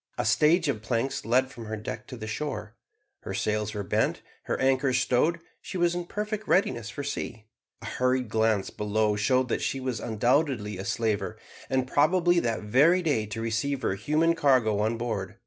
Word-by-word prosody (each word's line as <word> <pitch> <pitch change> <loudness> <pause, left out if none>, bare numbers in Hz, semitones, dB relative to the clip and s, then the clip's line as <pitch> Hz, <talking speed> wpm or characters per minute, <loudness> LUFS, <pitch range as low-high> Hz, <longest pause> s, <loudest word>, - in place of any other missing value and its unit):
A - - -1
stage 165 +2 +4
of 115 -7 -1
planks 115 +3 -2
led 130 +3 +2
from 115 -4 -9
her 110 0 -4
deck 105 - -6
to - - -8
the 110 - -6
shore. 110 -1 -4 0.5
Her - - -6
sails 105 0 -1
were 105 - -2
bent, 95 - 0 0.2
her - - -2
anchor 130 0 +2
stowed, 125 +7 +2 0.2
she - - -6
was 175 -1 +2
in 175 0 -4
perfect 210 +1 -4
readiness 120 - +1
for 140 - -6
sea. 115 -5 -5 0.4
A - - -7
hurried 125 -1 0
glance 110 -2 +1
below 105 0 0
showed 125 +5 +2
that - - -1
she 135 - -1
was 130 -3 -3
undoubtedly 115 - 0
a 95 - -5
slaver, 110 -3 -1 0.3
and 130 -1 +2
about 130 - -14
probably 175 +3 +4
that 115 -7 -1
very 150 - +4
day 125 -10 +1
to 105 +2 -5
receive 115 +4 -1
her 95 - +1
human 150 +11 +2
cargo 130 -10 +3
on 110 +2 0
board. 110 -5 -3
125 Hz, 190 wpm, -27 LUFS, 110-145 Hz, 0.5 s, stage